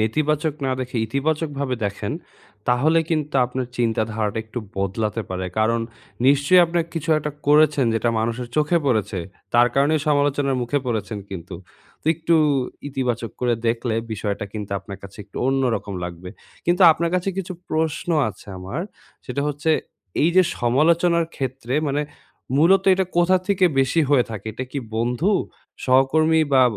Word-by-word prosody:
নেতিবাচক 150 Hz, +7 st, 0 dB
না 130 Hz, -, 0 dB
দেখে 125 Hz, -1 st, -4 dB
ইতিবাচকভাবে 140 Hz, +1 st, -1 dB
দেখেন। 100 Hz, 0 st, -3 dB, 0.6 s
তাহলে 145 Hz, +7 st, +3 dB
কিন্তু 150 Hz, -3 st, -1 dB
আপনার 125 Hz, +1 st, -3 dB
চিন্তাধারাটা 110 Hz, -2 st, -1 dB
একটু 110 Hz, +2 st, -6 dB, 0.2 s
বদলাতে 105 Hz, +3 st, -1 dB
পারে। 95 Hz, 0 st, -3 dB
কারণ 115 Hz, +2 st, +2 dB, 0.5 s
নিশ্চয়ই 140 Hz, +6 st, +5 dB
আপনি 170 Hz, +1 st, -1 dB, 0.2 s
কিছু 165 Hz, -1 st, -4 dB
একটা 150 Hz, 0 st, -3 dB, 0.2 s
করেছেন 150 Hz, -2 st, +5 dB
যেটা 115 Hz, +1 st, +1 dB
মানুষের 120 Hz, +2 st, -2 dB
চোখে 155 Hz, +3 st, +3 dB
পড়েছে। 110 Hz, -6 st, 0 dB, 0.4 s
তার 120 Hz, +1 st, +6 dB
কারণেই 145 Hz, +3 st, +3 dB
সমালোচনার 145 Hz, -2 st, +2 dB
মুখে 145 Hz, +4 st, 0 dB
পড়েছেন 110 Hz, -3 st, -2 dB
কিন্তু। 90 Hz, -1 st, -7 dB, 0.5 s
তো -, -, -20 dB
একটু 165 Hz, +1 st, +1 dB, 0.5 s
ইতিবাচক 125 Hz, -4 st, -2 dB
করে 120 Hz, -1 st, +2 dB
দেখলে 115 Hz, 0 st, 0 dB, 0.2 s
বিষয়টা 100 Hz, -1 st, -3 dB
কিন্তু 105 Hz, -2 st, -6 dB
আপনার 100 Hz, 0 st, -9 dB
কাছে 100 Hz, +1 st, -12 dB
একটু 100 Hz, -, -17 dB
অন্যরকম 130 Hz, -6 st, 0 dB
লাগবে। 90 Hz, +1 st, -7 dB, 0.4 s
কিন্তু 175 Hz, +2 st, +3 dB
আপনার 170 Hz, +2 st, -1 dB
কাছে 180 Hz, +1 st, 0 dB
কিছু 185 Hz, -1 st, -3 dB, 0.2 s
প্রশ্ন 160 Hz, +1 st, -1 dB, 0.2 s
আছে 100 Hz, -, -11 dB
আমার 95 Hz, -, -5 dB, 0.5 s
সেটা 140 Hz, +2 st, -2 dB
হচ্ছে, 145 Hz, +2 st, -1 dB, 0.5 s
এই 160 Hz, -, +5 dB
যে 185 Hz, -, +8 dB, 0.2 s
সমালোচনার 165 Hz, +7 st, +3 dB
ক্ষেত্রে 130 Hz, -1 st, -3 dB
মানে, 145 Hz, +2 st, 0 dB, 0.5 s
মূলত 180 Hz, +6 st, +5 dB
এটা 190 Hz, +1 st, +1 dB
কোথা 175 Hz, +2 st, +5 dB
থেকে 195 Hz, -2 st, +3 dB, 0.2 s
বেশি 135 Hz, +5 st, +2 dB
হয়ে 135 Hz, -4 st, +5 dB
থাকে? 110 Hz, -2 st, -7 dB
এটা 130 Hz, +4 st, -5 dB
কি 145 Hz, -, -2 dB, 0.2 s
বন্ধু, 125 Hz, -, +1 dB, 0.5 s
সহকর্মী 155 Hz, +5 st, +4 dB
বা 130 Hz, -1 st, +6 dB
135 Hz, 150 wpm, -22 LUFS, 115-155 Hz, 0.6 s, যে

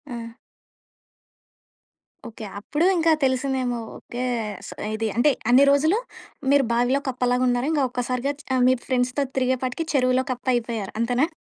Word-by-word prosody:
ఆ! 230 Hz, 0 st, -8 dB, 1.9 s
ఓకే. 225 Hz, -1 st, -10 dB, 0.2 s
అప్పుడు 295 Hz, -, -1 dB
ఇంకా 330 Hz, 0 st, +3 dB
తెలిసిందేమో! 260 Hz, -2 st, 0 dB, 0.2 s
ఓకే. 245 Hz, +1 st, -6 dB, 0.4 s
స -, -, -8 dB, 0.3 s
ఇది 225 Hz, 0 st, -1 dB
అంటే 290 Hz, +4 st, +5 dB, 0.2 s
అన్ని 260 Hz, +3 st, +7 dB
రోజులు 315 Hz, +8 st, +3 dB, 0.5 s
మీరు 280 Hz, -1 st, +5 dB
బావిలో 245 Hz, +4 st, +2 dB
కప్పలాగున్నారు. 250 Hz, +1 st, +1 dB
ఇంకా 290 Hz, -3 st, +2 dB
ఒక్కసారిగా 250 Hz, +2 st, -2 dB, 0.4 s
మీ 255 Hz, -, +5 dB
ఫ్రెండ్స్‌తో 255 Hz, +2 st, 0 dB
తిరిగే 260 Hz, 0 st, +2 dB
పాటికి 255 Hz, +6 st, -2 dB
చెరువులో 255 Hz, -1 st, +3 dB
కప్ప 250 Hz, +1 st, -6 dB
అయిపోయారు 225 Hz, -4 st, -3 dB
అంతేనా? 245 Hz, +6 st, +2 dB
255 Hz, 125 wpm, -24 LUFS, 245-275 Hz, 1.9 s, అన్ని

